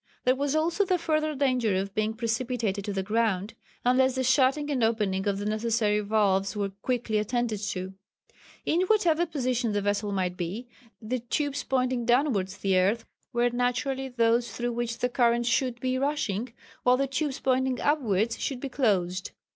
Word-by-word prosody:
There 250 - +4
was 285 +2 -1
also 335 +5 +2
the 370 -2 +1
further 310 -2 0
danger 255 -7 +1
of 195 +1 -2
being 215 +1 -1
precipitated 230 -3 -1
to 210 - -2
the 195 -1 -2
ground, 215 -1 0 0.3
unless 260 +1 +3
the 260 - 0
shutting 265 +3 +3
and 255 -5 0
opening 210 -3 0
of 200 -1 +1
the 205 - -4
necessary 215 0 +1
valves 200 -2 +1
were 200 -1 -1
quickly 235 -3 0
attended 225 0 -1
to. 190 -2 -4 0.7
In 340 - +2
whatever 350 -6 +3
position 250 -7 -1
the 205 - 0
vessel 205 0 0
might 185 -2 -1
be, 185 +8 -4 0.3
the 240 +3 -3
tubes 285 +4 -2
pointing 255 -2 0
towards 240 -7 +2
the 190 -1 +2
earth 205 +5 +1 0.3
were 240 -1 +2
naturally 255 +2 -1
those 235 -1 +2
through 240 0 -2
which 235 0 -3
the 250 - +1
current 240 -1 +2
should 245 0 +1
be 255 +1 -1
rushing, 255 -6 -1 0.3
while 250 0 +4
the 275 - +1
tubes 275 +1 -2
pointing 260 -1 +1
upwards 230 -7 +1
should 270 -3 -2
be 275 - -5
closed. 185 -8 0
240 Hz, 170 wpm, -27 LUFS, 210-260 Hz, 0.7 s, There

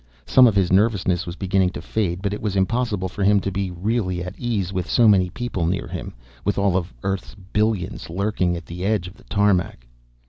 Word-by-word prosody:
Some 130 -1 +6
of 110 - +2
his 95 -3 +2
nervousness 95 -3 +2
was 85 - -5
beginning 95 -1 +1
to - - -5
fade, 95 -4 -2
but 100 0 0
it 105 - -5
was 105 -2 -2
impossible 105 -1 0
for 95 +2 -4
him 100 +1 +5
to 100 - -2
be 95 0 -2
really 90 0 -1
at 90 0 -6
ease 105 -6 -2
with 90 -2 -3
so 120 -2 +5
many 95 -4 +5
people 95 -5 -3
near 90 +2 -1
him, - - -7 0.3
with 100 - 0
all 100 -2 +2
of 90 -2 -1
Earth's 95 +2 -3
billions 105 -2 -2
lurking 90 -1 0
at - - -9
the 90 +2 -7
edge 100 -3 0
of 90 - -10
the 120 +4 -20
tarmac. 100 - +1
95 Hz, 215 wpm, -22 LUFS, 90-105 Hz, 0.3 s, Some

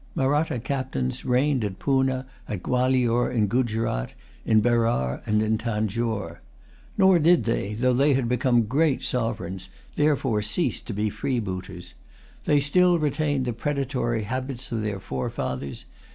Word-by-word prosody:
Mahratta 145 +1 +1
captains 125 - -3
reigned 130 0 +2
at 100 -2 -3
Poonah, 130 -1 +1 0.2
at 100 -4 -5
Gualior, 125 -1 +2
in 115 -4 +2
Guzerat, 115 - -1 0.3
in 110 -1 +5
Berar, 115 - +1
and 105 0 +2
in 110 0 +1
Tanjore. 110 -5 -2 0.6
Nor 190 -3 +5
did 165 -3 +4
they, 105 -2 -1
though 125 +3 +2
they 140 +3 +3
had 130 -3 0
become 120 0 +2
great 140 +5 +1
sovereigns, 95 -6 -2 0.3
therefore 135 -7 +2
cease 105 +12 -1
to 115 - -7
be 105 +1 -1
freebooters. 95 -6 -4 0.5
They 145 - +4
still 175 +5 +4
retained 145 -3 0
the 120 - -1
predatory 125 -3 -1
habits 130 +3 -5
of 115 -2 -1
their 105 -2 -3
forefathers. 65 -3 -4
120 Hz, 140 wpm, -25 LUFS, 105-135 Hz, 0.6 s, in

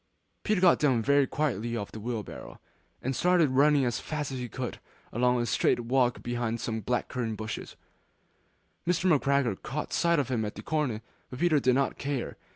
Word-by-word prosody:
Peter 215 -3 +1
got 180 -1 +5
down 130 -6 +2
very 140 +2 +4
quietly 120 -6 -1
off 100 -2 -5
the 110 - -8
wheelbarrow; 110 -1 -6 0.4
and 130 +1 -1
started 175 -4 +3
running 140 +1 +4
as 120 -2 -1
fast 150 -3 -4
as 130 - -4
he 125 -1 -4
could 125 +3 -4
go, - - -13 0.3
along 125 +1 +2
a 120 - 0
straight 120 - +2
walk 125 0 +1
behind 120 -1 -2
some 110 0 -3
black 125 +4 -1
currant 115 -4 -3
bushes. 110 0 -6 1.1
Mr. 180 +1 +1
McGregor 140 -7 +1
caught 150 +4 -4
sight 170 0 +3
of 140 -3 0
him 120 -4 0
at 105 - -4
the - - -8
corner, 135 -9 -1 0.3
but 125 - -7
Peter 160 -1 +3
did 130 -2 +3
not 135 0 0
care. 140 -3 -3
125 Hz, 190 wpm, -28 LUFS, 120-145 Hz, 1.1 s, got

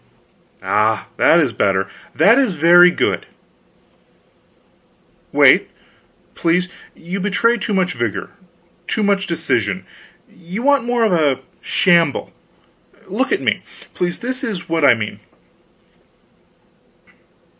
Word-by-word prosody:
Ah 110 +1 0
that 170 - +4
is 140 -8 0
better, 95 -2 0 0.3
that 230 +6 +5
is 250 -10 0
very 175 +3 +6
good. - - -2 2.0
Wait, - - +4 0.6
please; 175 +2 0 0.3
you 180 +4 -6
betray 210 +4 +1
too 225 -1 -5
much 185 -1 0
vigor, 115 -4 -4 0.6
too 220 - -1
much 200 -1 0
decision; 110 - -2 0.4
you 180 +7 -8
want 280 -3 +2
more 240 -1 0
of 220 - +2
a 150 -6 +1 0.2
shamble. 170 -5 +1 0.7
Look - - -2
at - - 0
me, - - 0 0.3
please 175 -1 -3
this 255 +1 -5
is 200 -6 -5
what 165 -1 -1
I 125 -4 +6
mean.... 105 -2 -6
175 Hz, 115 wpm, -18 LUFS, 140-205 Hz, 2.0 s, very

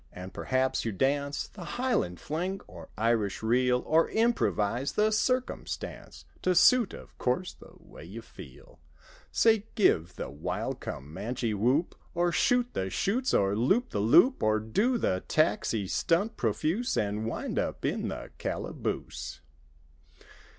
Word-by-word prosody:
And 90 +1 -9
perhaps 130 0 0
you 115 - -1
dance 140 +7 0
The 175 +1 -8
Highland 245 - 0
Fling 180 +5 -3
or - - -12
Irish 110 -2 0
Reel; 125 +2 +2
Or 160 +1 +3
improvise 135 - +1
the 215 +1 +2
circumstance 255 +4 -2 0.2
To 185 0 +2
suit, 235 +5 +5
of - - -13
course, 130 +9 -1
the - - -16
way - - -14
you 110 +7 -9
feel: 85 - -14 0.5
Say, 220 -2 +3
give 90 - +2
the - - -5
wild 75 +2 -3
Commanche 105 - -4
whoop. 125 - +1 0.2
Or 175 0 +2
shoot 245 +8 +2
the 95 0 -2
chutes, 245 - 0
or 100 0 +2
loop 190 - +2
the 105 - -1
loop. 120 - +5
Or 110 0 +3
do 205 - +1
the 95 - 0
Taxi 115 -8 +1
stunt 190 - +1
profuse 160 - 0
And 105 +1 -1
wind - - -2
up - - -3
in - - -1
the - - -6
calaboose. - - -4
130 Hz, 140 wpm, -29 LUFS, -, 0.5 s, suit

